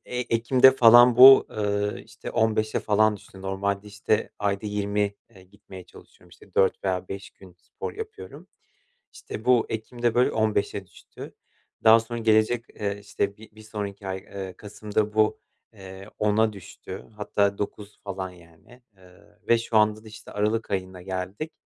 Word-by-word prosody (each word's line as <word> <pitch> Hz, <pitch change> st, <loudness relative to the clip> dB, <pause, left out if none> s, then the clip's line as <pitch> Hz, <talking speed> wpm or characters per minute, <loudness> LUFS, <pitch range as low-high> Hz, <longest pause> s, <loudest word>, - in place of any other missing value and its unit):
eee, 125 Hz, 0 st, -3 dB
ekimde 125 Hz, +3 st, +5 dB
falan 120 Hz, 0 st, +7 dB
bu, 135 Hz, +1 st, +9 dB
ııı, 105 Hz, -1 st, -2 dB
işte, 110 Hz, +1 st, -10 dB
15'e 110 Hz, -1 st, 0 dB
falan 105 Hz, 0 st, +2 dB
düştü 95 Hz, -1 st, -15 dB
normalde, 100 Hz, +1 st, -3 dB
işte, 105 Hz, +1 st, -1 dB
ayda 100 Hz, 0 st, -2 dB
20, 105 Hz, 0 st, -1 dB, 0.2 s
eee, 95 Hz, -4 st, -17 dB
gitmeye 95 Hz, -1 st, -14 dB
çalışıyorum, 90 Hz, -, -19 dB
işte, 90 Hz, +2 st, -19 dB
4 95 Hz, +1 st, +2 dB
veya 95 Hz, -1 st, -2 dB
5 95 Hz, 0 st, -7 dB
gün 95 Hz, -2 st, -17 dB
spor -, -, -8 dB
yapıyorum. 430 Hz, +1 st, -10 dB, 0.6 s
İşte, 110 Hz, -, -9 dB
bu 125 Hz, -2 st, +3 dB
ekimde 120 Hz, +1 st, -3 dB
böyle 125 Hz, +1 st, +3 dB
15'e 105 Hz, -3 st, -1 dB
düştü. 85 Hz, -, -13 dB, 0.5 s
Daha 110 Hz, +1 st, +7 dB
sonra 120 Hz, +1 st, -6 dB
gelecek, 110 Hz, +1 st, +2 dB
eee, 100 Hz, -1 st, -3 dB
işte, 100 Hz, 0 st, -3 dB
bir 110 Hz, -, -14 dB
bir 110 Hz, -, -13 dB
sonraki 105 Hz, -2 st, -7 dB
ay, 95 Hz, 0 st, -3 dB
eee, 95 Hz, -1 st, -8 dB
kasımda 105 Hz, 0 st, -3 dB
bu, 110 Hz, 0 st, +2 dB, 0.3 s
eee, 95 Hz, 0 st, -11 dB
10'a 105 Hz, +1 st, +2 dB
düştü, 95 Hz, 0 st, -10 dB
hatta 100 Hz, -1 st, 0 dB
9 105 Hz, 0 st, -6 dB
falan 95 Hz, -2 st, -5 dB
yani, 85 Hz, +8 st, -19 dB
eee, 90 Hz, -1 st, -21 dB
ve 115 Hz, -, +5 dB
şu 115 Hz, -1 st, -3 dB
anda 105 Hz, 0 st, +1 dB
da, -, -, -12 dB
işte, 110 Hz, -, -12 dB
aralık 105 Hz, +2 st, -1 dB
ayına 95 Hz, -2 st, -4 dB
geldik. 95 Hz, -, -5 dB
105 Hz, 160 wpm, -25 LUFS, 95-110 Hz, 0.6 s, bu